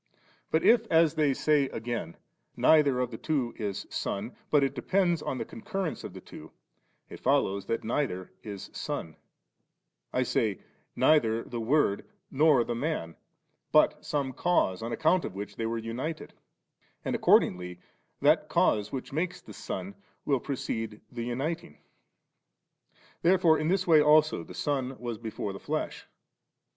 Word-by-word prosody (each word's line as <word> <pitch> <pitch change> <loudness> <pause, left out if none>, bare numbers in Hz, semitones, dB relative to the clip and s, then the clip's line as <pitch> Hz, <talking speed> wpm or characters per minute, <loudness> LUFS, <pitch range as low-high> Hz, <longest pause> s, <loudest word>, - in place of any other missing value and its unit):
But 160 - +1
i^ 230 -1 +5
as 165 -1 +4
they 155 -3 +2
say 145 +1 +2
again, 115 -7 -4 0.4
neither 145 -5 +5
of 125 - -1
tiie 110 - -8
two 135 -7 -1
is 100 -4 -4
Son, 105 +5 -3
but 145 -2 +4
it 135 0 0
depends 175 +5 +1
on 130 - -3
the - - -3
concurrence 195 -6 -4
of - - -7
the - - -8
two, - - -12 0.6
it - - -10
follows 100 0 +1
that 115 - -1
neither 110 -6 -2
is 100 -3 -8
Son; 80 -2 -4 1.0
I 130 - +1
say, 110 -5 0 0.4
neither 115 -7 +3
the 120 - -6
Word 115 -4 +2 0.3
nor 145 -3 +4
the 120 - -3
Man, 120 - -3 0.6
but - - +4
some 140 -3 -2
cause, 125 - +1
on 115 +1 -4
account 170 +6 +2
of - - -5
which 100 +1 -6
they 115 - -2
were 115 0 -2
united; 120 +8 -5 0.7
and - - 0
ac - - -4
cordingly 90 -1 +3 0.4
that - - +3
cause 105 -1 +2
which 135 0 -6
makes 170 +4 -2
the - - -13
Son 200 - -5 0.3
will 140 -3 +2
precede 115 -5 -4
the 120 -2 -4
uniting. 135 +7 -3 1.4
Therefore 175 -3 +4
in 155 - -1
this 185 +1 +1
way 160 -3 +6
also 155 +1 +4
the - - -11
Son 135 -3 -2
was 120 -3 -5
before 110 -3 -4
the 100 - -8
flesh. - - -4
130 Hz, 155 wpm, -29 LUFS, 110-155 Hz, 1.4 s, way